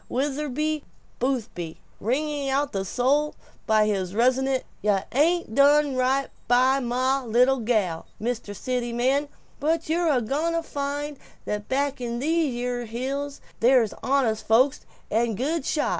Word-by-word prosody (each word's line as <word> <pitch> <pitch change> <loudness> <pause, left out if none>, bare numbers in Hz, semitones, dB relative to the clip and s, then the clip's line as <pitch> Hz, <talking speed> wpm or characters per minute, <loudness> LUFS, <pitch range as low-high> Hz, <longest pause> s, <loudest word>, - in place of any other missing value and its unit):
Witherbee 295 +3 -1 0.4
Boothby 230 -10 -2 0.2
wringing 280 +4 -1 0.2
the 195 -1 -2
soul 275 +9 +1 0.3
by 215 -1 +4
his 195 -3 -1
resonant 260 +3 +2 0.2
"Yuh 205 -2 +2
ain't 315 -2 +2
done 285 +1 +4
right 260 +2 +1 0.2
by 255 +3 +4
mah 260 +2 0
little 250 +3 +3
gal, 215 -8 0
Mr. 230 -2 -3
City 245 +1 -2
Man, 270 +4 +1 0.3
but 320 +2 0
yer 340 +1 +1
a 275 -4 +3
goin' 305 +9 0
to 335 0 0
find 290 -1 -4 0.3
that 210 0 -4
back 275 0 0
in 235 -1 -3
these 315 +2 +1
yere 245 0 -3
hills 275 +5 -4 0.2
there's 240 -3 +4
honest 255 -5 +1
folks 255 +5 +3 0.2
and 225 -1 +1
good 290 +4 -1
shots!" 300 - +1
260 Hz, 140 wpm, -25 LUFS, 235-285 Hz, 0.4 s, by